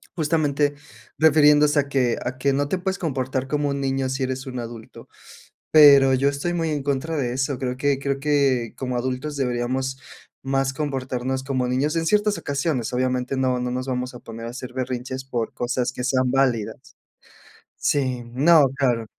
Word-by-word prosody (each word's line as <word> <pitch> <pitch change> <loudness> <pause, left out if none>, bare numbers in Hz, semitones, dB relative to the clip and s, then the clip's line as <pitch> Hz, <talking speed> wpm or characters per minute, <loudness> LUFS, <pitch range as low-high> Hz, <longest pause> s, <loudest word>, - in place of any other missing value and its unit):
justamente 150 -3 +1 0.4
refiriéndose 150 -1 +5
a 140 - 0
que 125 -4 +1
a 130 +1 -3
que 140 +2 +1
no 140 +1 0
te 185 - -1
puedes 190 +1 -2
comportar 130 -4 -2
como 145 0 0
un 140 0 -2
niño 135 -1 -1
si 135 +1 -2
eres 130 0 -3
un 130 -2 -5
adulto, 115 -1 -9 0.6
pero 140 -3 +8
yo 135 +2 +2
estoy 140 +5 -3
muy 165 -2 -1
en 145 -2 -2
contra 140 +3 -2
de 125 -4 -1
eso. 135 +1 -1
Creo 125 -1 -3
que 140 0 +1
creo 140 0 -2
que 135 -5 +1
como 125 -2 -3
adultos 130 +4 -3
deberíamos 130 +1 -1 0.4
más 135 0 0
comportarnos 130 -2 -3
como 130 -2 -1
niños, 135 +5 0
en 165 0 0
ciertas 210 +3 +2
ocasiones, 140 -4 -2
obviamente, 125 +1 -1
no 130 -1 0
no 125 0 -2
nos 130 +1 -3
vamos 125 -1 -3
a 120 - -9
poner 115 0 -9
a - - -5
hacer 125 0 -8
berrinches 130 0 -4
por 120 -4 -3
cosas 125 0 -1
que 125 - -6
sean 130 0 +1
válidas. 120 -5 +1 1.0
Sí, 130 -4 0
no, 145 +6 +5
claro. 125 -4 +1
135 Hz, 180 wpm, -23 LUFS, 125-145 Hz, 1.0 s, pero